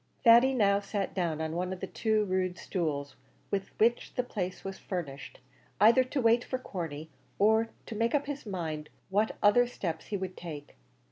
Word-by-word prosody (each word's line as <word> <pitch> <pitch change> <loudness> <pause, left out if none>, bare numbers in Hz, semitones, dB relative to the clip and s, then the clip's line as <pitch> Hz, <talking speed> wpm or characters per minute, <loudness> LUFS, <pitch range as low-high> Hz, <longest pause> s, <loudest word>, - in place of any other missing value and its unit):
Thady 240 +2 +7
now 200 -4 +4
sat 200 -1 -3
down 170 -5 -1
on 160 0 -3
one 180 +1 -2
of 185 - -5
the - - -3
two 215 -2 0
rude 185 -1 -1
stools 150 -6 -3 0.4
with 195 -1 -1
which 235 +2 +2
the 250 - +1
place 185 -6 -4
was 195 0 -6
furnished, 150 -7 -6 0.4
either 230 +6 +7
to 260 +2 -3
wait 235 0 +4
for 255 - -3
Corney, 160 - -6 0.3
or 220 +2 +4 0.2
to - - -7
make 230 +4 +1
up 285 - +1
his 285 -1 -5
mind 160 -6 -4 0.2
what 210 +3 +1
other 240 +4 +6
steps 170 -9 -4
he 205 - -2
would 185 -1 -5
take. 150 -4 -8
195 Hz, 185 wpm, -30 LUFS, 170-230 Hz, 0.4 s, Thady